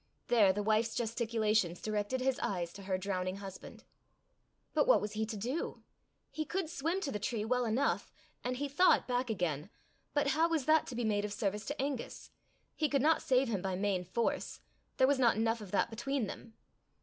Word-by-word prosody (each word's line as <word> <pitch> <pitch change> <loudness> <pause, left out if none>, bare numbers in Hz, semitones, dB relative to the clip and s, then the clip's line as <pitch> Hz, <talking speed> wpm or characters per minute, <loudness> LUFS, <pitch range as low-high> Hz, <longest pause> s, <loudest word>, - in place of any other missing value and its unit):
There 215 -5 +6
the 205 +2 -2
wife's 220 +2 +2
gesticulations 220 -6 0
directed 215 +4 -2
his 265 +1 +1
eyes 175 -7 -2
to 200 - -10
her 190 -1 -1
drowning 185 -1 -2
husband. 195 -1 -9 0.9
But - - +3
what - - +6
was 210 - -4
he 220 0 -2
to 220 -1 -4
do? 250 +11 -3 0.5
He 310 - -2
could 345 +1 -3
swim 330 +5 -1
to 280 - -2
the 210 - -3
tree 215 0 -2
well 250 +1 +1
enough, 235 +5 0 0.3
and, 250 +1 -2
he 285 +2 -1
thought, 350 +7 +4
back 250 0 0
again, 175 -5 -1 0.5
but 290 -1 +3
how 320 +4 +3
was 320 -5 0
that 310 +1 +4
to 250 - -6
be 240 - -1
made 205 -2 +1
of 210 - -3
service 205 0 -2
to 290 - -4
Angus? 270 -2 -4 0.4
He 305 -2 +1
could 275 -2 +2
not 320 +1 +4
save 260 0 +3
him 205 -5 -1
by 190 -1 -2
main 190 -1 0
force 205 +7 -2 0.4
there 260 - +6
was 275 0 +2
not 235 -5 +5
enough 225 +1 +1
of 205 - -8
that 205 +4 +1
between 240 +2 -1
them. 220 +2 -9
230 Hz, 200 wpm, -33 LUFS, 205-270 Hz, 0.9 s, There